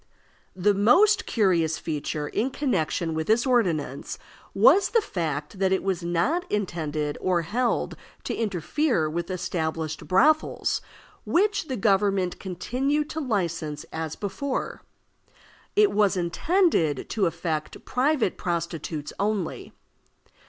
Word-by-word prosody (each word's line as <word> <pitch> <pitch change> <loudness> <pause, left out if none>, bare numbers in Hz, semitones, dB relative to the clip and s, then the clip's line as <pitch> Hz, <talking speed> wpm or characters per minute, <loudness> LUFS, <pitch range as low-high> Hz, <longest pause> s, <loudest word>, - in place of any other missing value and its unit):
The 195 +3 +3
most 385 - +4
curious 175 -7 +2
feature 150 -1 -3
in 235 - -1
connection 175 - -1
with 160 0 -2
this 225 +2 +3
ordinance 170 - 0 0.4
was 400 - +6
the 465 - +4
fact 160 - -4
that 190 -1 +2
it 190 - +1
was 190 -3 -1
not 175 - 0
intended 155 -7 -2
or 180 -2 +1
held 235 +8 -1 0.3
to - - -3
interfere 215 - 0
with 170 +3 -3
established 160 -3 -3
brothels, 300 +12 +2 0.4
which 405 0 +1
the 260 - -3
government 195 -3 +1
continued 265 - -1
to 320 - -3
license 170 - -2
as 160 -1 -4
before. 255 +7 -3 0.9
It 420 0 +5
was 205 -2 +2
intended 175 - +1
to 205 -5 +2
affect 165 -2 -4
private 260 - +1
prostitutes 165 -3 -3
only. 200 -4 -2
190 Hz, 115 wpm, -25 LUFS, 165-250 Hz, 0.9 s, was